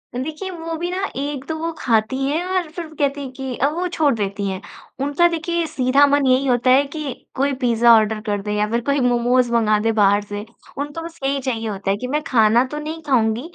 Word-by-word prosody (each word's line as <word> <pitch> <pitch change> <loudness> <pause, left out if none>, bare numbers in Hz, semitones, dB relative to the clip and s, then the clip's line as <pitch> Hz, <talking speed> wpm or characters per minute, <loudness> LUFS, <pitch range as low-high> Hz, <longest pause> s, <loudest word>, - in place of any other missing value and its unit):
देखिए 310 +9 -4
वो 330 -2 -6
भी 345 +2 -3
ना 380 +2 -2
एक 280 0 -3
तो 320 - -2
वो 330 +1 -2
खाती 225 +2 +1
हैं 315 +5 0
और 370 -3 -1
फिर 340 0 -6
वो 315 - -16
कहती 285 0 0
हैं 265 -2 -6
कि 265 -1 -5
अ, 275 - +2
वो 345 +4 -2
छोड़ 315 -5 +1
देती 200 -1 -3
हैं। 190 0 -4 0.4
उनका 290 +5 +3
देखिए 340 +1 -1
सीधा 265 +2 +3
मन 285 0 +2
यही 260 +1 +3
होता 245 0 +2
है 270 +2 +6
कि 290 -2 -5 0.2
कोई 275 +1 +1
पिज़्ज़ा 240 -2 +4
ऑर्डर 220 0 +2
कर 205 -1 -1
दो 210 - -4
या 210 0 +1
फिर 235 +2 0
कोई 280 +3 0
मोमोज़ 245 0 +2
मँगा 215 -2 +3
दें 225 +1 +1
बाहर 205 -1 +4
से 205 0 -6 0.3
उनको 290 +3 -4
बस 330 0 -9
यही 275 +1 0
चाहिए 235 -4 -3
होता 195 -1 -2
है 200 - 0
कि 250 - -5
मैं 295 +4 -1
खाना 225 0 +4
तो 300 - -4
नहीं 315 +2 -6
खाऊँगी 230 -3 +2
265 Hz, 235 wpm, -20 LUFS, 225-305 Hz, 0.4 s, है